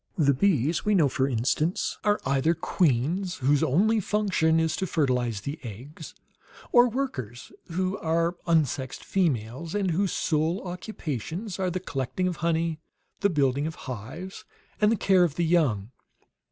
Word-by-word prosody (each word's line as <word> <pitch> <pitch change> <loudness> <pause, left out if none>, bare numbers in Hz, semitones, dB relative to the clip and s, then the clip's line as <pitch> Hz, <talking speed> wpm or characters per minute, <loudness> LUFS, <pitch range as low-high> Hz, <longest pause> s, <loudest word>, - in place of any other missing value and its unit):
The 140 -4 +4
bees 155 - +1
we 210 0 +2
know, 160 -6 +5
for 130 0 0
instance, 140 +7 0
are 210 0 +2
either 140 +5 +2
queens, 165 +4 0
whose 140 +2 +2
only 190 +10 +3
function 190 -6 +1
is 160 -1 +1
to 190 - -2
fertilize 125 -9 0
the 140 +7 -5
eggs; 130 +7 -9 0.6
or 245 0 +6
workers, 135 - -4 0.2
who 185 +3 -1
are 165 +2 0
unsexed 145 -5 0
females, 155 - -1
and 195 -3 +1
whose 190 +3 +1
sole 160 +5 0
occupations 180 - -5
are 185 -1 +1
the 180 +1 -2
collecting 160 +2 -2
of 180 -3 -2
honey, 165 -1 0 0.4
the 200 - +3
building 140 -3 +1
of 160 - -5
hives, 130 - -7 0.4
and 210 +1 +5
the - - +3
care 190 -3 +4
of 160 -5 0
the 170 - +1
young. 130 - +1
160 Hz, 155 wpm, -26 LUFS, 135-185 Hz, 0.6 s, or